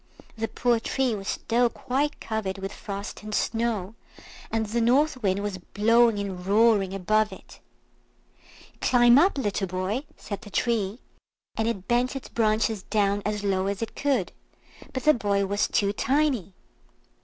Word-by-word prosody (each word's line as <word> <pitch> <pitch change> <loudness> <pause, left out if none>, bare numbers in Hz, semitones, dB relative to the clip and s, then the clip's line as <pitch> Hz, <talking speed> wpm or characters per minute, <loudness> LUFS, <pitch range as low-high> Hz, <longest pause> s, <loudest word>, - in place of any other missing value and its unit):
The 225 0 -2
poor 240 0 +1
tree 255 +2 0
was 200 -1 -6
still 240 +2 +1
quite 280 +5 -2
covered 215 -4 -3
with 195 0 -5
frost 200 0 -6
and 215 0 -4
snow, 225 -4 -1 0.6
and 225 -1 0
the 230 +3 -1
North 255 +3 +2
Wind 200 -1 0
was 200 -2 -3
blowing 230 +4 +3
and 195 -3 -4
roaring 200 -1 +3
above 215 +3 +1
it. 190 - -13 1.2
"Climb 240 +1 +6
up! 360 0 +3
little 205 -6 -1
boy," 185 +9 -2
said 200 -2 -6
the 220 - -11
Tree, 215 -1 0 0.6
and 220 - 0
it 195 -5 -3
bent 245 +3 +1
its 270 - -7
branches 220 -1 +1
down 205 0 0
as 210 -1 -2
low 190 -1 0
as 200 +2 -2
it 225 - -7
could; 265 -10 0 0.6
but 260 - -4
the 305 - +6
boy 200 -5 0
was 200 +1 0
too 200 0 +1
tiny. 260 - 0
215 Hz, 155 wpm, -26 LUFS, 200-240 Hz, 1.2 s, Climb